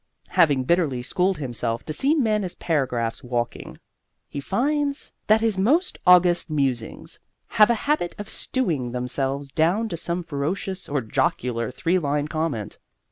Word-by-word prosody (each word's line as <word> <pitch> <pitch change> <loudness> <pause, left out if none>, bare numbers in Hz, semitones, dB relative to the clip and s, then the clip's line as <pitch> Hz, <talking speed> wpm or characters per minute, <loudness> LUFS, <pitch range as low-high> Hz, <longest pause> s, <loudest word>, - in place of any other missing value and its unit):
Having 145 -5 +3
bitterly 145 -5 +1
schooled 180 +7 0
himself 120 -4 -3
to 155 - -4
see 280 - +3
men 215 -8 +1
as 180 - -3
paragraphs 125 -8 -1
walking, 120 -1 -3 0.5
he 145 - -6
finds 280 - -1 0.2
that 215 +1 +5
his 220 -4 +1
most 305 - +2
august 180 -1 +5
musings 135 -6 -2 0.3
have 210 0 +5
a 235 - +4
habit 285 - 0
of 205 - -6
stewing 160 - -1
themselves 135 +3 -2
down 170 +11 +1
to 170 - -4
some 170 +2 -3
ferocious 175 +6 -4
or 140 -1 0
jocular 120 -1 -1
three 170 +8 0
line 145 -1 -1
comment. 155 -9 -3
160 Hz, 145 wpm, -24 LUFS, 130-195 Hz, 0.5 s, that